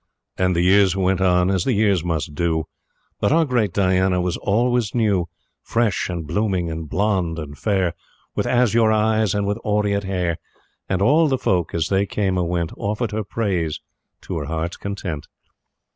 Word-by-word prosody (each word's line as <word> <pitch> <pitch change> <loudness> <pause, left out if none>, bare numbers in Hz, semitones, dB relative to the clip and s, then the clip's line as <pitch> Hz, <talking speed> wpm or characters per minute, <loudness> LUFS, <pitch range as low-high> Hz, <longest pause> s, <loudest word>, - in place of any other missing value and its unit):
And 90 -1 +1
the 85 - +2
years 95 0 +4
went 95 0 +1
on 90 0 +3
as 95 -3 +1
the 130 - +1
years 100 -5 +2
must 80 -3 -2
do; 80 0 0 0.5
But - - +1
our 165 +1 +4
great 120 -7 +1
Diana 95 -1 +2
was 90 -1 -1
always 120 +1 0
new 100 -7 +1 0.3
Fresh, 115 -6 0
and 85 -3 -4
blooming, 90 0 -1
and 80 -1 -6
blonde, 95 -4 0
and 75 -2 -6
fair, 95 -1 0 0.4
With - - -1
azure 115 -2 +3
eyes 110 -1 +2
and 100 0 0
with 100 +1 -1
aureate 105 -1 0
hair; 90 -3 -1 0.5
And 95 0 +1
all 155 +8 +4
the 135 -2 +1
folk, 90 -9 0
as 85 +2 0
they 100 +1 +1
came 95 -3 0
or 85 - 0
went, 85 -1 -1
Offered 105 +3 -2
her 110 +1 -2
praise 95 -7 -2 0.4
to - - -4
her - - -4
heart's 80 +1 -3
content. 95 -7 -5
95 Hz, 175 wpm, -21 LUFS, 85-105 Hz, 0.5 s, years